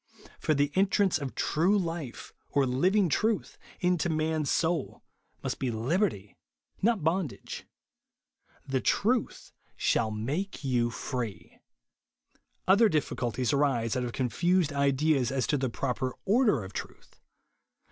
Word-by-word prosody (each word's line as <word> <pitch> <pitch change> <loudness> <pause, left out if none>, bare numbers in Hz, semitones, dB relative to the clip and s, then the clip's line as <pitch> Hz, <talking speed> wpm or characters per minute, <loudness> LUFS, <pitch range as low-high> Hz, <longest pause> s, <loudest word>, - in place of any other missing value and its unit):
For 155 - +1
the 145 +1 +1
entrance 195 -2 +2
of 140 -3 -5
true 180 +7 +2
life, 165 -9 -4 0.2
or 140 -1 +2
living 180 +11 +2
truth, 215 +7 0 0.2
into 180 -1 +1
man's 155 -2 0
soul, 170 0 0 0.4
must - - -3
be 130 - -1
liberty, 115 - -1 0.5
not 220 -4 +2
bondage. 165 -2 -2 1.0
•' - - -9
The 130 -1 +1
ivuth 235 +2 0 0.3
shall 110 - +1
make 140 - -3
you 120 -3 +1
free." 115 -6 -5 1.1
Other 205 +4 +6
difficulties 125 - -1
arise 135 -6 +1
out 125 - 0
of 120 - -3
confused 165 - +1
JESUS - - -7
ONLY. 140 - +4
189 150 +3 +2
ideas 125 - -1
as 130 -3 0
to 145 - +1
the 130 -1 0
proper 130 +1 -2
order 210 - +3
of 95 +1 -9
truth. - - -9
145 Hz, 135 wpm, -29 LUFS, 125-180 Hz, 1.1 s, Other